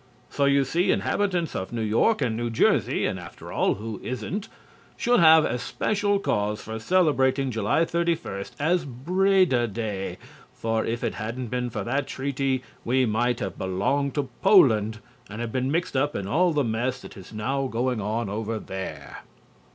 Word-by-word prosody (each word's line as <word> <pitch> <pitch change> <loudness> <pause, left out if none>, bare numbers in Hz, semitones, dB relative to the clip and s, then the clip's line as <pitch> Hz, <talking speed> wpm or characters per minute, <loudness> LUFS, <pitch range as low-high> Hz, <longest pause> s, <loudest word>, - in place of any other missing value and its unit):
So, 140 - +1
you 140 0 +4
see, 170 +7 0
inhabitants 180 -5 0
of 95 - -4
New 115 -2 -2
York 115 - +2
and 115 -3 0
New 120 +1 -2
Jersey 115 - +2
(and, - - -2
after - - -10
all, - - +1
who 110 +1 -6
isn't?) 130 - -4 0.5
should 245 0 +3
have 160 -2 +7
especial 205 - 0
cause 105 - -1
for 110 +1 -6
celebrating 135 -3 +2
July 110 +9 +1
31 165 - -1
as 170 +3 +2
Breda 165 0 +2
Day, 105 -2 -4 0.4
for 115 -1 -1
if 115 +1 -3
it - - -1
hadn't 115 +2 -5
been 125 0 -2
for - - -4
that 135 +4 -1
treaty 135 -1 -1 0.2
we 130 +2 +2
might 120 +2 0
have 95 - -4
belonged 100 +10 0
to 145 -3 -1
Poland 115 - +5 0.3
and 110 +2 -5
been 130 +1 -1
mixed 170 -2 -1
up 145 +3 +1
in 100 - -3
all 170 - +2
the 150 -2 +1
mess 120 +3 -1
that - - -11
is 95 -1 -12
now 135 +5 -1
going 125 -1 -1
on 110 +2 -2
over 110 +2 -3
there. 80 -9 -7
125 Hz, 165 wpm, -25 LUFS, 110-150 Hz, 0.5 s, have